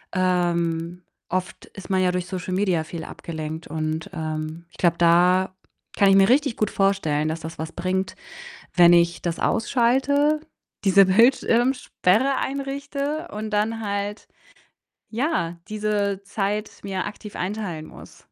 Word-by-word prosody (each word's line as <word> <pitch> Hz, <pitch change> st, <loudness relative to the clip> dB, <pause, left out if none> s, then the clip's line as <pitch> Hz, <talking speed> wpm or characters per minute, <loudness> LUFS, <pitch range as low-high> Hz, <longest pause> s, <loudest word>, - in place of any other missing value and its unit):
ähm, 175 Hz, -1 st, 0 dB, 0.3 s
oft 185 Hz, 0 st, -3 dB
ist 195 Hz, 0 st, -8 dB
man 190 Hz, -1 st, +3 dB
ja 180 Hz, -1 st, +3 dB
durch 180 Hz, -1 st, -2 dB
Social 185 Hz, -1 st, -4 dB
Media 185 Hz, -5 st, +1 dB
viel 160 Hz, 0 st, -7 dB
abgelenkt 160 Hz, 0 st, -6 dB
und, 155 Hz, +3 st, -3 dB
ähm, 155 Hz, 0 st, -4 dB
ich -, -, -20 dB
glaube, 170 Hz, -2 st, +3 dB
da 180 Hz, +2 st, +4 dB, 0.4 s
kann 200 Hz, -1 st, +5 dB
ich 195 Hz, -, +6 dB
mir 195 Hz, 0 st, +6 dB
richtig 275 Hz, -1 st, +3 dB
gut 215 Hz, -, +1 dB
vorstellen, 175 Hz, -7 st, +1 dB
dass 160 Hz, +1 st, -2 dB
das 160 Hz, +1 st, -8 dB
was 160 Hz, +1 st, -4 dB
bringt, 185 Hz, +2 st, -2 dB, 0.6 s
wenn 175 Hz, -1 st, +7 dB
ich 170 Hz, 0 st, +3 dB
das 170 Hz, -1 st, -2 dB
ausschalte, 270 Hz, +6 st, +2 dB, 0.5 s
diese 195 Hz, 0 st, +7 dB
Bildschirmsperre 240 Hz, +1 st, +3 dB
einrichte 280 Hz, +3 st, -3 dB
und 215 Hz, +1 st, -5 dB
dann 220 Hz, +2 st, 0 dB
halt, 205 Hz, 0 st, -3 dB, 0.8 s
ja, 230 Hz, -, -1 dB
diese 210 Hz, -2 st, -1 dB
Zeit 205 Hz, +1 st, -2 dB
mir 190 Hz, -2 st, -2 dB
aktiv 210 Hz, 0 st, -8 dB
einteilen 180 Hz, -5 st, -4 dB
muss. -, -, -14 dB
190 Hz, 140 wpm, -23 LUFS, 170-215 Hz, 0.8 s, wenn